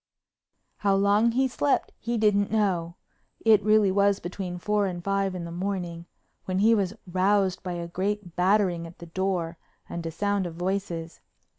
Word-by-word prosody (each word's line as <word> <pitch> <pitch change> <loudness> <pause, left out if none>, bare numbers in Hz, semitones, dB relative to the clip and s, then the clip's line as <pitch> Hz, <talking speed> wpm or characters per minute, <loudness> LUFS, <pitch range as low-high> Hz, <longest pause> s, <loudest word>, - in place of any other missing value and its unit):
How 200 -1 +2
long 205 +4 +3
he'd 260 +1 +1
slept 285 +2 +1
he 235 0 -2
didn't 205 -2 +3
know—it 200 +2 0
really 215 -2 +4
was 200 0 +3
between 180 0 -5
four 205 +2 +1
and 175 -2 -5
five 195 -1 0
in 175 -2 -5
the 170 - -7
morning—when 180 0 -5
he 220 +4 +5
was 200 -2 0
roused 190 +1 +1
by 180 -1 -4
a 170 -1 -4
great 190 0 -3
battering 180 -2 +2
at 165 - -14
the 170 - -10
door 175 -1 -2 0.3
and 170 - -5
a 165 - -3
sound 200 +3 -1
of 165 - -8
voices. 175 -2 -3
190 Hz, 160 wpm, -26 LUFS, 175-205 Hz, 0.3 s, he